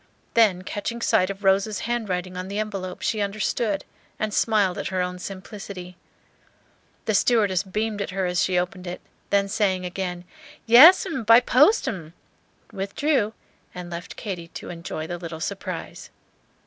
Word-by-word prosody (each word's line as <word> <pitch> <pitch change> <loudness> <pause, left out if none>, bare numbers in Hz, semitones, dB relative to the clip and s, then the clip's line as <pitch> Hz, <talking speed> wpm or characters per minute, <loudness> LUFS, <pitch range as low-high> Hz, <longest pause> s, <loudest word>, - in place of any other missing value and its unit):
Then 205 -6 +4
catching 210 +5 -4
sight 185 -5 +2
of 200 +1 -6
Rose's 195 +2 +2
handwriting 190 -6 -2
on 185 +1 -5
the 200 +1 -4
envelope, 195 -4 -4
she 215 - 0
understood, 205 0 -1 0.3
and 215 -1 -2
smiled 205 -6 +2
at - - -3
her 190 -1 -2
own 180 0 -2
simplicity. 190 -1 -8 1.1
The 215 - +1
stewardess 205 -4 +3
beamed 210 +2 -3
at - - -3
her 190 0 -2
as 180 -1 0
she 185 -1 +1
opened 180 +1 -2
it, 175 - -5 0.3
then 200 0 +2
saying 195 -3 0
again, 180 -1 -4 0.4
"Yes, 285 +13 +9
'm, 320 -10 -3
by 230 +2 +8
post, 290 - +4
m'm," 165 -6 -5 0.6
withdrew, 215 +4 0 0.4
and 180 -1 -7
left 170 0 -7
Katy 180 -6 -6
to 165 - -8
enjoy 170 -2 -5
the 175 +1 -5
little 165 -2 -7
surprise. 155 - -5
195 Hz, 155 wpm, -24 LUFS, 180-215 Hz, 1.1 s, Yes